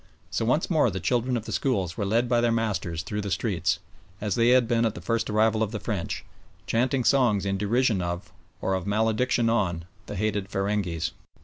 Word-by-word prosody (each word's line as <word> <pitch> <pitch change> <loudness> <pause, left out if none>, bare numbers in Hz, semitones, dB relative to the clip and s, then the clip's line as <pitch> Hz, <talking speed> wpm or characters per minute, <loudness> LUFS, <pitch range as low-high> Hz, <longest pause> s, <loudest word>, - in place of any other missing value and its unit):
So 115 - 0
once 150 +8 +2
more 155 -8 +3
the 95 -2 -4
children 125 +5 +1
of 110 - -5
the - - -6
schools 95 -10 0
were 100 -4 -2
led 115 +4 +2
by 120 -1 +2
their 120 -1 +2
masters 95 -7 -1
through 105 0 -3
the 100 - -4
streets, - - 0 0.4
as 105 -1 -1
they 115 0 +3
had 125 -1 +5
been 115 -1 +2
at 110 -2 0
the - - -6
first 115 -1 -1
arrival 110 +1 +2
of 110 - +1
the 110 - -3
French, 100 -4 -3 0.4
chanting 125 +3 +1
songs 120 -7 +3
in 100 0 0
derision 110 0 +2
of, 85 +1 -4 0.3
or 95 - 0
of 95 0 -2
malediction 110 +3 +2
on, 90 -7 0 0.2
the - - -5
hated 105 -1 -1
feringhees. 95 -5 -1
110 Hz, 205 wpm, -26 LUFS, 100-120 Hz, 0.4 s, had